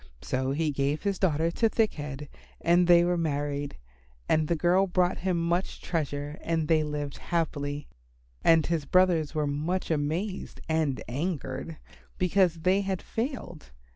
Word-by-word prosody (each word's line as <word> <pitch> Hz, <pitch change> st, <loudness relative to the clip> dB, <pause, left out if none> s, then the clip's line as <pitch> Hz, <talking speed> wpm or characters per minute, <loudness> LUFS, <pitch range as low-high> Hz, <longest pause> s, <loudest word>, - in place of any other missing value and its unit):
So 130 Hz, +1 st, -1 dB
he 150 Hz, +2 st, 0 dB
gave 140 Hz, +2 st, -1 dB
his 200 Hz, -2 st, -1 dB
daughter 165 Hz, -2 st, +2 dB
to 225 Hz, +6 st, +2 dB
Thick 220 Hz, -1 st, +1 dB
head, 145 Hz, -1 st, -6 dB, 0.3 s
and 175 Hz, +1 st, +4 dB
they 175 Hz, -1 st, +7 dB
were 175 Hz, 0 st, +1 dB
married, 145 Hz, -2 st, -2 dB, 0.5 s
and 155 Hz, -1 st, +2 dB
the 170 Hz, -, +1 dB
girl 180 Hz, +4 st, +3 dB
brought 180 Hz, 0 st, +1 dB
him 185 Hz, 0 st, 0 dB
much 170 Hz, +2 st, -1 dB
treasure 145 Hz, -2 st, -3 dB
and 165 Hz, -2 st, -1 dB
they 160 Hz, -1 st, +4 dB
lived 145 Hz, -2 st, -4 dB
very -, -, -15 dB
happily. 145 Hz, -4 st, -1 dB, 0.6 s
And 165 Hz, -2 st, +5 dB
his 165 Hz, -4 st, -1 dB
brothers 170 Hz, -2 st, +3 dB
were 150 Hz, -1 st, +1 dB
much 155 Hz, +6 st, -2 dB
amazed 160 Hz, +7 st, -2 dB
and 160 Hz, -4 st, 0 dB
angered 150 Hz, +4 st, -3 dB, 0.4 s
because 180 Hz, -2 st, +2 dB
they 185 Hz, +3 st, +3 dB
had 190 Hz, -2 st, -3 dB
failed. 225 Hz, -, -5 dB
165 Hz, 155 wpm, -28 LUFS, 145-180 Hz, 0.6 s, they